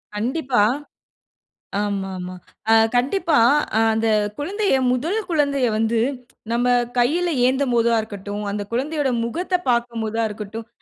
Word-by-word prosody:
கண்டிப்பா. 250 0 +1 1.2
ஆமாமா. 190 -3 -3 0.4
ஆ - - +6 0.2
கண்டிப்பா 290 +5 +2 0.6
அந்த 225 +1 0 0.3
குழந்தைய 390 +3 0 0.2
முதல் 320 - -1
குழந்தைய 280 -4 +1
வந்து 225 +1 +1 0.5
நம்ப 245 +1 +1 0.3
கைல 335 +8 +2
ஏந்தம் 265 0 +1
போதா 235 0 +3
இருக்கட்டும். 205 0 -6
அந்த 205 0 -3
குழந்தையோட 280 +3 0
முகத்த 355 +10 -3 0.2
பார்க்கும்போதா 230 -2 -1
இருக்கட்டும். 215 +1 -7
240 Hz, 105 wpm, -21 LUFS, 220-290 Hz, 1.2 s, ஆ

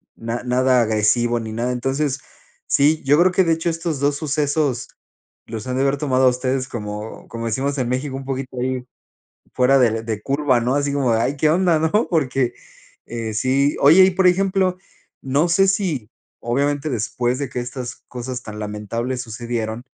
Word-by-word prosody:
na 115 +1 -4
nada 125 0 +3
agresivo 115 +2 +2
ni 110 - -6
nada, 120 +3 -2
entonces, 135 +3 -1 0.5
sí, 150 +2 +3
yo 145 +3 +4
creo 180 +1 +5
que 190 - +4
de 165 - +1
hecho 165 +1 -1
estos 165 -3 -3
dos 145 0 +1
sucesos 145 -3 -1 0.6
los 110 +1 -6
han 125 - -2
de 135 - +1
haber 140 +1 +1
tomado 130 -3 +2
a - - +8
ustedes 130 +1 -1
como 105 -1 -6
como 115 0 -5
decimos 135 +5 -1
en 125 - -1
México, 130 +2 -2
un 135 0 -6
poquito 130 -1 -5
ahí 130 -1 -2 0.7
fuera 130 +2 +4
de 115 -3 +2
de 110 -2 -4
curva, 140 -3 +1
¿no?, 125 +3 0
así 145 0 0
como: 130 -4 +1
"Ay, 115 +5 +1
qué 155 +2 +2
onda", 175 -1 +3
¿no?, 185 +8 +1
porque, 135 -6 +1 0.5
eh, 115 -2 -4
sí 135 +5 +2
Oye, 165 +7 +8
y, 190 - +4
por 190 +1 +2
ejemplo, 185 0 +2 0.5
no 140 +6 +2
sé 195 +3 +4
si, 160 - -1 0.3
obviamente, 140 +5 0
después 120 +1 -1
de 140 -3 -3
que 125 - -3
estas 125 0 -5
cosas 125 0 -5
tan 105 -1 -8
lamentables 115 +4 -3
sucedieron, 115 0 -4
130 Hz, 180 wpm, -21 LUFS, 120-145 Hz, 0.7 s, a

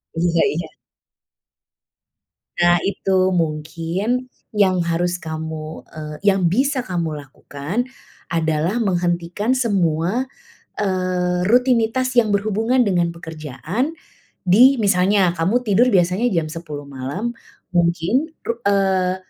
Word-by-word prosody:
Iya 170 0 +2
iya. 165 +1 -3 1.9
Nah, 175 0 +5
itu 190 -1 +1
mungkin 170 +8 -1 0.3
yang 190 -4 +3
harus 175 +1 -1
kamu, 160 -1 -6
eee 150 -1 -7
yang 190 -4 +3
bisa 265 - +1
kamu 170 -6 -3
lakukan 145 - -5 0.5
adalah 165 +7 0
menghentikan 175 +3 0
semua, 195 -2 +1 0.6
eee, 180 -2 0
rutinitas 250 +2 +2
yang 220 -3 +4
berhubungan 220 +5 +1
dengan 175 -6 +1
pekerjaan 165 - -4 0.5
di 240 +9 +6
misalnya 195 -2 +3
kamu 185 +9 +1
tidur 225 +3 +3
biasanya 185 +2 +2
jam 165 -3 0
10:00 155 -4 -7
malam, 140 - -4 0.4
mungkin 175 - +1 0.2
ru 235 0 -3
eee, 190 -2 +2
180 Hz, 105 wpm, -20 LUFS, 165-215 Hz, 1.9 s, di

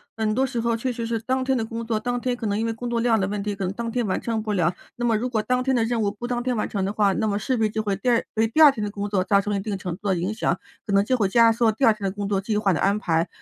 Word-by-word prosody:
很 220 -1 0
多 265 +3 +2
时 235 -2 -3
候 230 0 0
确 250 +2 -2
实 230 0 -4
是 230 -1 -1
当 260 +3 -1
天 265 0 +1
的 225 - -1
工 230 0 -5
作 225 -2 -1
当 245 +1 -2
天 250 -1 0
可 230 - -5
能 205 0 0
因 225 - -1
为 225 - 0
工 240 +2 -5
作 235 -1 0
量 230 -2 +3
的 190 - 0
问 200 0 -3
题， 205 -1 -2
可 195 -1 -3
能 185 - -2
当 230 +1 -4
天 240 -3 -1
完 185 - -1
成 225 -2 -2
不 215 -1 -2
了。 175 -2 +1 0.2
那 240 - -3
么 225 -2 +2
如 245 +4 -2
果 220 -3 0
当 250 0 +1
天 265 0 +1
的 230 - +2
任 230 0 0
务 205 - +1
不 210 +4 -7
当 240 0 -1
天 250 -1 -1
完 215 - -2
成 195 -2 -1
的 200 - -2
话， 205 -2 +3
那 220 +3 0
么 200 -1 0
势 245 +5 -1
必 220 -1 +2
就 215 +1 -2
会 200 -2 -1
第 255 - -6
2 235 - +3
给 225 0 +2
第 310 +8 +1
2 295 -2 +10
天 220 - -6
的 210 - -1
工 205 0 -4
作 195 -3 +1
造 200 +1 +3
成 205 - -3
了 200 - 0
一 - - -4
定 200 -1 -3
程 180 -1 -5
度 205 - -6
的 190 - +2
影 180 +5 -2
响， 220 - 0 0.3
可 200 - -1
能 200 0 +5
就 255 +4 +1
会 205 -4 +2
压 230 +2 +5
缩 230 0 +2
第 220 +5 -2
2 225 - +6
天 210 -2 -7
的 - - -5
工 205 0 -3
作 195 -1 +1
计 210 +1 -1
划 205 -2 +2
的 165 - 0
安 200 +2 +2
排。 165 -3 0
220 Hz, 390 characters per minute, -24 LUFS, 200-235 Hz, 0.3 s, 2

